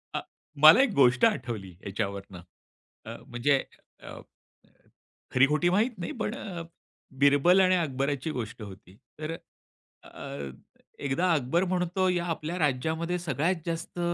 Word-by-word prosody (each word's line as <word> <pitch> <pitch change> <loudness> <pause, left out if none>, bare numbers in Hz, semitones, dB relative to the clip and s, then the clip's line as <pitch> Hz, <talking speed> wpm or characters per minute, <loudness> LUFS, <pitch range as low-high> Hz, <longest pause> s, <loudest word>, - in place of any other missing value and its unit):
अ, - - -1 0.4
मला 160 +12 +10
एक 270 -5 +2
गोष्ट 125 - +5
आठवली 120 - -2
याच्यावरनं 100 -2 -5 0.6
अ, - - -7
म्हणजे 130 +3 +1 0.4
अ, - - -10 1.1
खरी-खोटी 150 +6 +3
माहीत 215 +7 +2
नाही 170 - -4
पण 215 +2 -2
अ, 175 -9 -6 0.6
बिरबल 145 +7 +5
आणि 185 0 +4
अकबराची 140 -2 -1
गोष्ट 115 -4 -6
होती. 100 -1 -12 0.2
तर 155 +1 -4
अ, - - -18
अ, 70 -1 -7 0.6
एकदा 170 +7 +1
अकबर 155 +5 +1
म्हणतो, 180 +1 0
"या 175 -1 0
आपल्या 160 +4 -5
राज्यामध्ये 160 +5 -1
सगळ्यात 165 +3 0
जास्त 170 +1 -5
155 Hz, 125 wpm, -27 LUFS, 125-175 Hz, 1.1 s, मला